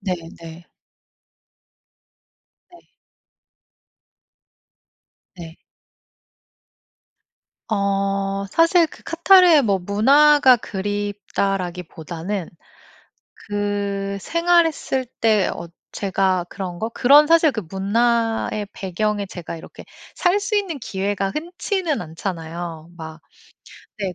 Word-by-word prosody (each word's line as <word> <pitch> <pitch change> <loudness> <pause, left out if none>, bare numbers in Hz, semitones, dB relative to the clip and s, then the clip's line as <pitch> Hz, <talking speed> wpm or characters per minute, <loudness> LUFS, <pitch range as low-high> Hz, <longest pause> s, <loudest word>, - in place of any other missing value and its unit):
네. 190 -3 -2 0.3
네. 165 +1 -11 2.1
네. 350 - -16 2.6
네. 165 -1 -10 2.1
어 195 -1 -1
사실 330 +1 +4
그 - - -14
카타르의 340 -3 +5
뭐 200 -3 +1
문화가 265 +8 +5
그립다라기보다는 195 -3 -4 1.0
그 200 -1 -2
생활했을 335 - +1
때 215 -4 +3
어 170 - -8 0.2
제가 190 -2 0
그런 180 -3 -6
거? 225 +1 -2
그런 285 +6 +5
사실 330 -1 +5
그 225 -5 -4
문화의 225 +3 0
배경에 205 +2 -2
제가 175 -2 -8
이렇게 160 - -12 0.3
살 365 +2 +2
수 410 +1 -1
있는 365 -8 -2
기회가 195 -1 -2
흔치는 345 - -3
않잖아요 165 -1 -6
막. 160 -1 -9 0.8
네 190 -3 -3
205 Hz, 170 characters per minute, -21 LUFS, 185-285 Hz, 2.6 s, 카타르의